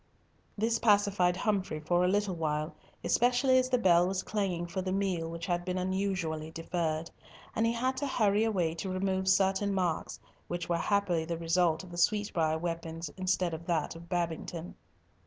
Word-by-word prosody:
This 225 +2 +1
pacified 200 -4 +3
Humfrey 190 -7 -1
for 175 +3 +1
a - - +3
little 205 0 +1
while, 155 -1 -2 0.3
especially 245 +7 +3
as 255 0 0
the 255 - +3
bell 175 -5 +4
was 190 0 -1
clanging 190 -5 -1
for 180 +2 -3
the 185 0 -3
meal 185 -4 -1
which 165 0 -5
had 175 0 -1
been 180 +1 -2
unusually 185 -4 -1
deferred, 165 -1 -2 0.4
and 225 +1 +2
he 230 - +1
had 255 +3 -1
to 285 - -1
hurry 210 -4 +2
away 185 -8 +1
to 170 +4 -5
remove 190 0 -1
certain 195 +1 +3
marks, 180 -4 -1 0.3
which 175 -1 -3
were 170 - +1
happily 190 -5 +1
the 165 +1 -3
result 165 0 +1
of 180 - -12
the 175 - -8
sweetbrier 170 -5 +1
weapons 165 -1 -4
instead 185 -2 0
of 165 +1 -7
that 165 -2 0
of 170 +1 -12
Babington. 170 -1 -3
180 Hz, 175 wpm, -30 LUFS, 165-200 Hz, 0.4 s, bell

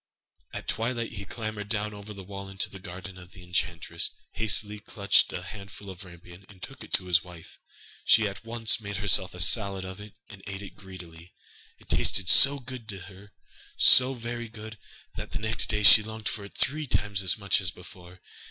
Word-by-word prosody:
At - - -8
twilight, 115 +1 -3
he 100 -2 -8
clambered 110 0 -6
down 105 -1 -2
over 105 +1 -10
the 100 -2 -10
wall 100 +1 -9
into 95 0 -2
the 95 - -10
garden 95 +1 -10
of 90 0 -15
the 90 - -13
enchantress, 90 -1 -2 0.2
hastily 105 -1 +1
clutched 100 -1 +1
a 90 - -6
handful 100 +1 -10
of 95 +1 -11
rampion, 90 0 -14
and 100 -2 -16
took - - -10
it - - -14
to - - 0
his 90 -1 +2
wife. 90 -2 -14 0.4
She 110 -1 +4
at 100 +2 -8
once 115 -1 0
made 100 -2 -6
herself 95 -2 +2
a - - -10
salad 95 +1 +2
of 95 +2 -9
it, 105 -1 -12
and 100 -2 -13
ate 95 0 -7
it 95 - -11
greedily. 85 -3 -13 0.4
It - - -22
tasted 90 -2 +2
so 140 +1 +8
good 125 -4 -10
to 100 -3 -7
her 100 +2 -14 0.5
so 130 +1 +7
very 120 -1 -6
good, 110 -1 -11 0.4
that - - -8
the - - -2
next 110 +1 +1
day 105 -1 0
she 105 +2 +9
longed 110 0 -7
for 105 -2 -4
it 100 - -14
three 150 +2 -1
times 100 -5 0
as 95 0 +3
much 100 -1 +2
as 95 - 0
before. 90 +1 -14
100 Hz, 200 wpm, -27 LUFS, 95-110 Hz, 0.5 s, she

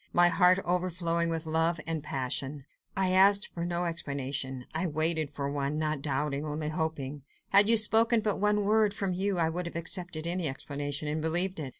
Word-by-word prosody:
My 175 0 +5
heart 180 +1 +4
overflowing 175 -1 -1
with 165 0 -2
love 160 +1 0
and 165 -1 -3
passion, 135 0 -3 0.3
I 190 -1 +1
asked 200 +2 +4
for 170 - -4
no 175 0 -2
explanation—I 140 -1 -3
waited 155 -1 +2
for 140 -1 -5
one, 140 +1 -2
not 155 -2 -2
doubting—only 150 +2 -3
hoping. 155 -3 -4 0.3
Had 200 +2 +7
you 230 - +7
spoken 225 +2 +4
but 210 -2 -1
one 210 0 +1
word, 210 -1 +2
from 195 -3 -2
you 190 +1 -1
I 165 -2 +1
would 175 +2 -4
have 170 - -9
accepted 170 -1 -3
any 175 -1 -1
explanation 145 +1 -4
and 155 +1 -2
believed 175 +3 0
it. 140 -4 -5
165 Hz, 180 wpm, -29 LUFS, 150-185 Hz, 0.3 s, Had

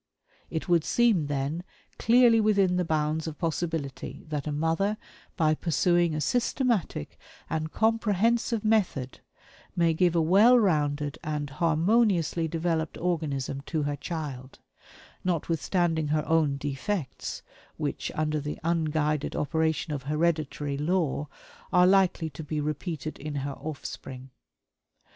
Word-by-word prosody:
It 160 - -4
would 170 -3 +3
seem, 215 -7 +2
then, 145 +4 -2 0.4
clearly 235 -1 +5
within 200 -4 +3
the 180 - +2
bounds 155 0 0
of 155 - -6
possibility 160 -4 -3
that 150 -2 -3
a - - -1
mother, 165 +8 0 0.4
by 155 -3 +3
pursuing 170 +1 +2
a 155 - -2
systematic 235 - 0 0.3
and 155 0 -2
comprehensive 225 +1 +1
method, 185 - +1 0.6
may 170 -2 +3
give 175 +1 +2
a - - +4
well 200 +10 +6
rounded 150 - +1
and 150 -2 -3
harmoniously 170 - +2
developed 160 -1 -1
organism 145 -6 -2
to 155 -2 -1
her 145 0 -1
child 140 -5 -6 0.7
notwithstanding 165 -1 0
her 150 0 0
own 155 -4 +2
defects, 145 +3 -4 0.3
which, - - -3
under 155 0 0
the 150 +1 -4
unguided 155 -3 0
operation 160 0 0
of 145 - -3
hereditary 150 -1 -1
law, 155 -3 0 0.4
are 180 0 +6
likely 185 -4 +3
to 150 +3 -8
be 150 0 -3
repeated 155 +1 -4
in 150 0 -5
her 140 0 -3
offspring. 135 -2 -7
160 Hz, 125 wpm, -27 LUFS, 150-180 Hz, 0.7 s, well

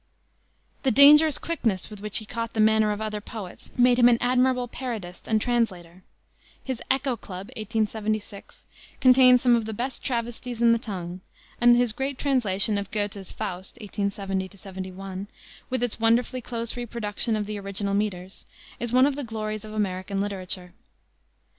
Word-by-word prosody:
The 270 - +2
dangerous 295 +4 +7
quickness 225 - -2
with 210 - -9
which 210 -1 0
he 215 - -3
caught 230 +1 -4
the 220 - -3
manner 215 0 +4
of 210 +1 -3
other 210 -1 -3
poets 205 -4 -9
made 245 0 +5
him 245 0 +7
an 235 - +4
admirable 250 0 +2
parodist 225 -8 -6
and 220 -1 +2
translator. 190 -7 -1 0.6
His 260 -3 -4
Echo 265 -1 +1
Club, 190 -3 -9
1876, 215 -1 -3 0.4
contains 255 -1 +6
some 245 -2 +5
of 230 -2 0
the 220 -1 -5
best 250 +3 -4
travesties 240 -1 -3
in 235 0 +5
the 230 - +3
tongue, 185 -6 -6 0.4
and 240 0 +7
his 245 -2 +3
great 270 +4 -3
translation 215 -7 +1
of 200 -1 -6
Goethe's 205 -2 -3
Faust, 190 -3 -5
1870 200 -2 -3
71 190 0 -7 0.4
with 255 -2 -1
its 245 -2 -2
wonderfully 235 +3 +2
close 230 -1 -4
reproduction 230 -2 -1
of 210 -1 -1
the 210 0 -5
original 200 0 -3
meters 195 -2 -3 0.3
is 240 -1 -3
one 255 +2 +6
of 285 -1 +1
the 290 - -4
glories 215 -2 -4
of 215 - -9
American 195 -2 -2
literature. 185 -2 -4
220 Hz, 160 wpm, -25 LUFS, 200-245 Hz, 0.6 s, dangerous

